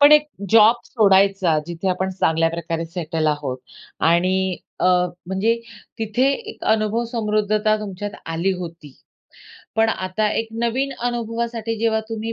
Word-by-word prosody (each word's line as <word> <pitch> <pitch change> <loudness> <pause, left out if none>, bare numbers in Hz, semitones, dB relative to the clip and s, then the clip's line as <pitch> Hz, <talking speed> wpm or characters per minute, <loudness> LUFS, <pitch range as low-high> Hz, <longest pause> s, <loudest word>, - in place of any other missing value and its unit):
पण 290 +1 +8
एक 300 0 +6 0.2
जॉब 225 +1 +7
सोडायचा, 195 -6 +3
जिथे 175 +2 -3
आपण 185 +1 0
चांगल्या 165 -3 +2
प्रकारे 165 0 -3
सेटल 165 -2 -2
आहोत. 145 -4 -1 0.4
आणि 185 +2 +2 0.2
अ, - - +3 0.4
म्हणजे 190 +5 +1 0.4
तिथे 225 +3 0 0.3
एक - - -11
अनुभव 220 +2 0
समृद्धता 215 -1 +1
तुमच्यात 205 0 -5 0.2
आली 165 +4 0
होती. 165 -5 -8 0.8
पण 225 0 +4
आता 200 +2 -1
एक 225 - -2
नवीन 260 +4 0 0.2
अनुभवासाठी 230 -1 -3
जेव्हा 225 -1 +1
तुम्ही 225 0 -4
205 Hz, 130 wpm, -21 LUFS, 175-225 Hz, 0.8 s, पण